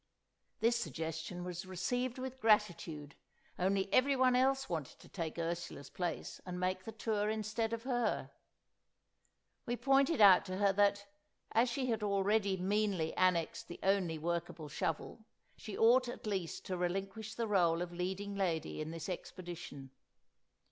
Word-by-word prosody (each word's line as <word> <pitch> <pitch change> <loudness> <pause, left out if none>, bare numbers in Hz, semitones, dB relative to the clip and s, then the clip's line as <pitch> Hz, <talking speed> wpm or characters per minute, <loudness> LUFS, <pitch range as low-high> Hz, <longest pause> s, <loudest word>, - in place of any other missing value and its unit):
This 235 +1 +4
suggestion 165 -4 -4
was 180 +1 -5
received 245 +8 -1
with 260 0 -5
gratitude, 175 - +1 0.5
only 190 +1 +2
everyone 260 -1 +4
else 270 +1 +3
wanted 160 -6 -4
to - - -16
take 165 -4 -5
Ursula's 170 -3 -4
place, 175 -3 -4
and 180 -1 -5
make 185 +1 -1
the 225 - -5
tour 215 -1 -1
instead 220 +1 -1
of 230 0 -3
her. 245 -3 0 1.4
We 240 - 0
pointed 275 +3 +3
out 195 -3 +8
to 185 0 -4
her 200 -1 +3
that, 200 0 +3 0.5
as 235 +3 +3
she 255 +2 -1
had 225 - -1
already 200 0 +2
meanly 195 -3 0
annexed 180 -3 +1
the 175 - -8
only 190 -4 +2
workable 165 -1 -3
shovel, 165 +9 -3 0.3
she 215 - -7
ought 245 +3 +5
at 240 - -7
least 190 -6 -3
to 185 - -2
relinquish 195 +5 -3
the 230 -1 -1
rôle 175 -5 +3
of 175 0 -4
leading 190 +3 -3
lady 175 -6 -1
in 155 - -4
this 165 -1 -6
expedition. 175 -7 -7
195 Hz, 150 wpm, -35 LUFS, 175-225 Hz, 1.4 s, out